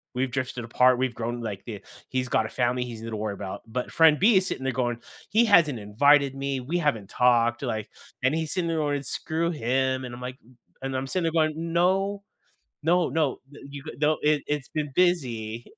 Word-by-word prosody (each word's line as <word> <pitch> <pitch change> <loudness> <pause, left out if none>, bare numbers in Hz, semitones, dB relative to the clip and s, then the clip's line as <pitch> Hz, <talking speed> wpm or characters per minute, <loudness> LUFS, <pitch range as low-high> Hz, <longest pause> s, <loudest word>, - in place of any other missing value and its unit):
we've 130 0 -1
drifted 125 -2 -3
apart, 125 +2 +4
we've 130 -1 0
grown, 120 +1 -3
like, 100 -4 -5
the 105 -4 -7 0.3
he's 130 -1 -1
got 110 - +2
a - - -10
family 125 0 0
he's 115 -2 -8
gonna 115 -1 -5
worry 105 -1 -2
about." 95 -1 -6
But, 125 +3 -4
friend 160 -2 +5
B 210 +1 +5
is 185 0 +2
sitting 130 - -4
there 135 -1 -1
going, 120 -1 -1 0.3
"He 225 +4 +4
hasn't 170 - +5
invited 140 +7 +3
me, 135 -1 -2
we 150 +8 -2
haven't 115 - -1
talked," 120 -1 +3
like, 110 -4 -3 0.3
and 130 +3 +3
he's 160 -1 -2
sitting 180 -3 -1
there 165 - -1
going, 145 -2 -1
"Screw 165 +3 -1
him." 130 -2 0
And 120 -1 -7
I'm 125 - -11
like 125 +1 -6 0.4
and 135 0 -3
I'm 130 - -2
sitting 180 +5 -1
there 165 - +1
going, 155 -2 +2
"No. 185 +5 +1 0.6
No, 175 +2 +3
no, 150 -1 0
the 145 - -13
you 140 -1 -8
h 135 - -8
no, 155 +1 +2
it 150 -1 +2
It's 145 -2 -2
been 150 -2 -3
busy." 120 -11 0
135 Hz, 215 wpm, -26 LUFS, 120-160 Hz, 0.6 s, friend